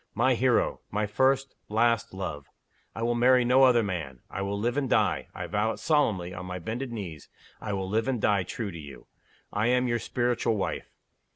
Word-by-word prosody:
My - - +3
hero! - - +2
my 105 +1 0
first, 135 +5 +1 0.2
last, 115 +1 +2
love! 85 -7 -5 0.5
I 115 - -3
will 120 +1 +2
marry 125 +1 +4
no 125 +2 +5
other 120 -3 +5
man. 80 - -4
I 95 - -4
will 100 +1 -2
live 120 +4 -1
and 140 -3 0
die - - +2
I - - -4
vow 110 +2 0
it - - -9
solemnly 110 - +1
on 90 0 -7
my 90 0 -4
bended 115 +8 -4
knees 90 -10 -7 0.3
I 105 - -3
will 95 -1 -2
live 110 +5 0
and 130 -3 0
die 100 -2 +2
true 100 +3 -4
to 85 - -8
You. 70 -3 -11 0.5
I 105 +3 +1
am 125 +1 +2
your 120 -1 0
Spiritual 120 -2 0
Wife. 100 - -3
110 Hz, 200 wpm, -28 LUFS, 95-120 Hz, 0.5 s, no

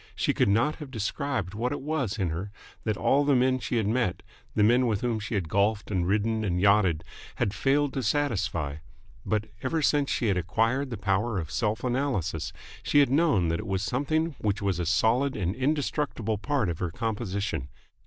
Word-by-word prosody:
She - - +1
could - - +2
not 115 +10 +2
have 150 -4 -8
described 115 - -2
what 120 +4 -1
it - - -2
was 135 -8 -2
in 95 -6 0
her 90 +6 -4 0.4
that 110 -2 0
all 140 +2 +3
the 145 -1 +3
men 130 +1 +3
she 125 - -3
had 110 - +1
met, 105 -4 0 0.3
the 105 - +4
men 120 +4 +4
with 105 -3 0
whom 120 -3 0
she 110 +2 -4
had 95 -5 -1
golfed 100 +4 +1
and 90 -3 0
ridden 110 +3 +1
and 90 -4 0
yachted, 95 -5 +3 0.3
had 100 - 0
failed 135 +7 +1
to 135 - -1
satisfy: 100 - 0 0.5
but, 110 -1 0 0.2
ever 155 +4 -1
since 145 -1 +2
she - - 0
had 100 -4 +2
acquired 115 - 0
the 115 - -4
power 105 +3 0
of 80 -4 -4
self 110 0 -1
analysis, 105 - -1 0.3
she - - +1
had 140 -3 +5
known 140 - +3
that 85 +1 0
it 110 - -6
was 95 0 -1
something 150 +8 0
which 105 -1 0
was 100 -4 -1
a 85 - -1
solid 125 +9 +2
and 95 -2 -1
indestructible 135 -5 -1
part 140 -2 0
of 85 -2 -3
her 90 - -1
composition. 100 - -3
110 Hz, 200 wpm, -27 LUFS, 95-130 Hz, 0.5 s, had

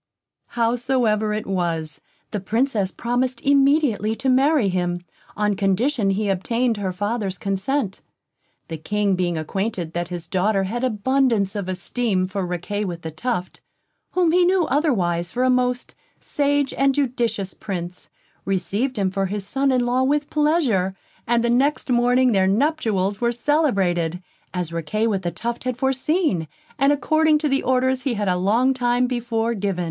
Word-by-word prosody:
Howsoever 230 -2 +1
it 210 0 -2
was, 170 -5 -2 0.3
the 210 - -2
Princess 215 -1 0
promised 245 +1 -1
immediately 275 -6 +3
to 265 +3 -1
marry 270 -2 +3
him, 175 -1 -2 0.3
on 210 -1 +1
condition 205 +4 +1
he 205 +2 0
obtained 230 +5 0
her 195 -2 -2
father's 205 0 -2
consent. 195 +3 -2 0.7
The 165 - -5
King 205 +3 0
being 175 -2 -1
acquainted 175 +1 -3
that 175 0 -2
his 175 -1 -5
daughter 195 +3 +1
had 235 +6 -3
abundance 235 -3 +1
of 200 -3 -3
esteem 185 +1 -1
for 190 +1 -3
Riquet 180 +4 -3
with 170 -2 -6
the 160 - -5
Tuft, 185 +2 -3 0.5
whom 355 -3 +3
he 360 +1 +4
knew 360 -1 +3
otherwise 190 - 0
for 250 +7 -1
a 255 - +4
most 250 0 0 0.3
sage 285 -1 0
and 275 0 +2
judicious 235 -8 -1
Prince, 180 -3 -6 0.3
received 205 +7 -1
him 195 -2 0
for 195 0 -1
his 200 0 -4
son 270 +5 +1
in 250 -1 +2
law 245 +1 +1
with 290 +2 0
pleasure; 285 - +1 0.3
and 235 0 +2
the 235 - +1
next 270 +2 +1
morning 245 +1 +3
their 190 -3 +3
nuptials 210 -5 0
were 235 0 +2
celebrated, 195 - +1 0.3
as 180 -3 -4
Riquet 170 +7 -1
with 205 -4 0
the 175 - -2
Tuft 235 +8 -4
had 255 -2 -2
foreseen, 265 - 0 0.3
and 275 +1 +4
according 310 +2 +3
to 300 0 -1
the 275 -1 +1
orders 260 0 +1
he 250 -2 -1
had 205 -1 -2
a 180 - +2
long 225 +9 +2
time 245 -1 +1
before 235 -2 -1
given. 200 -4 -2
225 Hz, 160 wpm, -22 LUFS, 190-260 Hz, 0.7 s, he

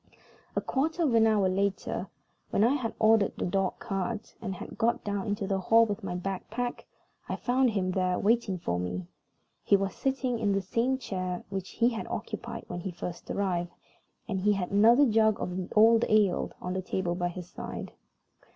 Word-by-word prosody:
A - - +1
quarter 320 +5 0
of 280 -7 +2
an 225 -1 +5
hour 210 -3 +3
later, 195 0 -1 0.4
when 205 - +2
I 240 +4 +4
had 255 -6 -2
ordered 220 -2 +4
the - - -1
dog 190 +1 0
cart, 215 0 -4
and 195 -4 -4
had - - -8
got 235 +1 +1
down 200 -1 -2
into 205 -1 -1
the 195 0 0
hall 225 +5 +5
with 210 0 -4
my 180 -2 -3
bag 190 +1 -3
packed, 245 +2 -3 0.4
I - - -1
found 255 +1 +2
him 190 -4 0
there 185 -1 +1
waiting 220 -3 +2
for 90 - -2
me. 90 0 -3 0.6
He 200 - +5
was 195 -1 -2
sitting 260 -3 -1
in 205 -3 +1
the 195 - +1
same 235 +7 +1
chair 185 -7 -4
which 190 -1 -4
he 235 +1 +2
had 230 -2 -5
occupied - - -5
when 175 - -5
he 190 - -4
first 175 0 -7
arrived, 175 -3 -1 0.5
and 195 -4 -1
he 205 +2 +3
had 190 -3 -2
another 230 +7 +6
jug 220 -3 +3
of 180 - -3
the 185 0 -4
old 225 +2 +6
ale 210 -4 +3
on 180 - -4
the 185 - -1
table 185 -1 -2
by 175 0 -1
his 175 0 -8
side. - - -6
200 Hz, 195 wpm, -29 LUFS, 185-230 Hz, 0.6 s, another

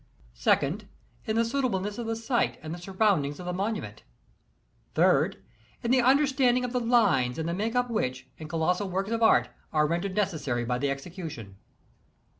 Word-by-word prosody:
2d 150 - +1 0.2
— - - -34
In 220 - 0
the 230 +1 +3
suitableness 225 -5 -1
of 235 - -4
the 225 - -1
site 230 +2 0
and 155 0 -5
the 175 - -7
surround 190 -2 +2
ings 145 +1 -5
of 180 - -7
the 180 - -2
monument 205 +4 -3 0.9
3d - - +3 0.3
— - - -32
In 235 - 0
the 260 0 +5
understanding 260 -1 +3
of 245 - -5
the 250 - +1
lines 205 - +2
and 160 0 -2
the 170 - -1
make 220 +6 -2
up 245 0 +2
which, 130 - -2
in 155 - -7
colossal 180 +5 0
works 195 +3 -2
of 230 0 -1
art, 120 - +4 0.2
are 150 -1 +3
rendered 175 +5 -2
necessary 150 -12 -1
by 125 +1 -1
the 140 +1 0
execution. 140 - -6
190 Hz, 190 wpm, -27 LUFS, 155-230 Hz, 0.9 s, the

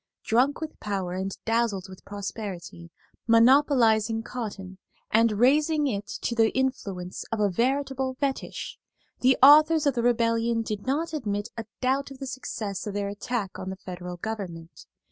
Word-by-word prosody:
Drunk 255 +7 +2
with 315 -1 -6
power 195 -4 -3
and 190 +1 -3
dazzled 225 -4 0
with 185 -1 -13
prosperity, 200 -4 -7 0.4
monopolizing 230 -2 +4
cotton 200 -6 -6 0.3
and 225 0 +4
raising 295 +7 +3
it 205 -6 -2 0.2
to - - 0
the 225 -1 +4
influence 195 -9 -2
of 225 - -1
a 205 -2 +2
veritable 265 +4 0
fetich, 275 0 -4 0.4
the 255 +1 +4
authors 305 +2 +7
of 285 - +3
the 240 - -1
Rebellion 230 -1 +1
did 215 0 -5
not 315 +5 -1
admit 205 -7 -2
a 230 -1 -5 0.2
doubt 270 +2 +1
of 270 - -10
the 270 - -6
success 215 -6 -5
of 205 - -4
their 200 -1 -1
attack 205 -1 -4
on 185 - -5
the 190 - -4
Federal 180 -2 -7
government. 175 -5 -7
225 Hz, 155 wpm, -26 LUFS, 200-265 Hz, 0.4 s, authors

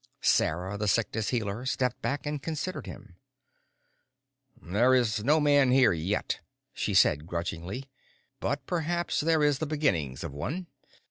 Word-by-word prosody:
Sarah 90 +5 +1
the 105 - -1
Sickness 110 +1 0
Healer 110 -1 -2
stepped 125 -1 -1
back 145 +1 -2
and 150 -1 -3
considered 155 0 -4
him. 100 -4 -11 1.4
"There 115 +9 +3
is 115 -3 +1
no 150 +6 +4
man 145 -3 +4
here 130 -4 +5
yet," 85 +6 -2 0.3
she - - -2
said 75 +2 +4
grudgingly. 85 +8 -4 0.5
"But 140 -1 -2
perhaps 175 +1 -1
there 160 0 +2
is 145 -2 +2
the 155 - -2
beginnings 90 - -1
of - - -5
one." 130 - -4
125 Hz, 140 wpm, -28 LUFS, 100-145 Hz, 1.4 s, here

